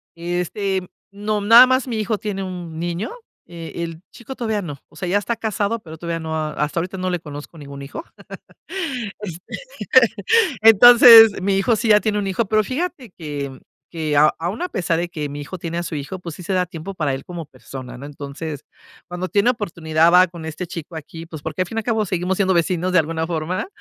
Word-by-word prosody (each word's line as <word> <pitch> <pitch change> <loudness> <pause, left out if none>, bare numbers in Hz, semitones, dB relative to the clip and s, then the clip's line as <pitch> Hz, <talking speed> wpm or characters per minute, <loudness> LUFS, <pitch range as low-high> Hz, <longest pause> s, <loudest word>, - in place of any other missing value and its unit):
Este, 180 +3 -2 0.3
no, 210 +1 -2
nada 230 +5 +8
más, 260 0 +1
mi 230 - -3
hijo 215 0 -1
tiene 200 -2 -4
un 175 -4 -7
niño. 175 +3 -3 0.4
Eh, 170 0 -7
el 165 -1 -7
chico 250 +3 -9
todavía 220 -4 -2
no, 150 -7 -6
o - - -23
sea, 180 - -5
ya 195 - +3
está 205 +3 -2
casado, 220 0 -2
pero, 160 -5 -11
todavía 170 0 -4
no, 160 -1 -4
hasta 155 0 -2
ahorita 185 +3 -4
no 185 0 -2
le 180 -1 -1
conozco 150 +1 -10
ningún 140 -2 -9
hijo. 140 - -7 1.2
Este, 180 -4 -7 1.2
entonces, 225 -1 +9
mi 195 +1 +1
hijo 195 +4 +2
sí 230 +2 -1
ya 210 -1 +6
tiene 210 -1 0
un 205 - -2
hijo, 195 +4 -1
pero, 215 +2 +2
fíjate 275 - -4
que 145 -4 -6 0.3
que, 155 -3 -2 0.2
aun 175 +7 -3
a 360 - -1
pesar 170 - -1
de 175 +1 -2
que 150 -4 -4
mi 145 +1 -6
hijo 145 +6 -7
tiene 170 0 -4
a - - -1
su 165 - -5
hijo, 145 +6 -5
pues, 170 -3 -8
sí - - -10
se 185 - -4
da 180 -1 +1
tiempo 170 +2 -7
para 150 -6 -1
él 135 - -7
como 170 -3 -7
persona, 130 -1 -10
¿no? 135 - -9
Entonces, 145 +1 -7 0.4
cuando 180 +1 -4
tiene 200 +6 +2
oportunidad, 170 -7 +1
va 180 +1 +7
con 170 -1 -10
este 160 +3 -5
chico 170 0 -8
aquí, 165 +1 -8
pues 160 -2 -9
porque 160 +4 -2
al 185 - -5
fin 225 - -4
y - - +2
al - - -11
cabo 220 -2 +1
seguimos 180 +1 -1
siendo 190 -1 +2
vecinos 175 +1 0
de 185 - +5
alguna 160 +1 -2
forma. 165 +2 -2
175 Hz, 215 wpm, -21 LUFS, 160-205 Hz, 1.2 s, entonces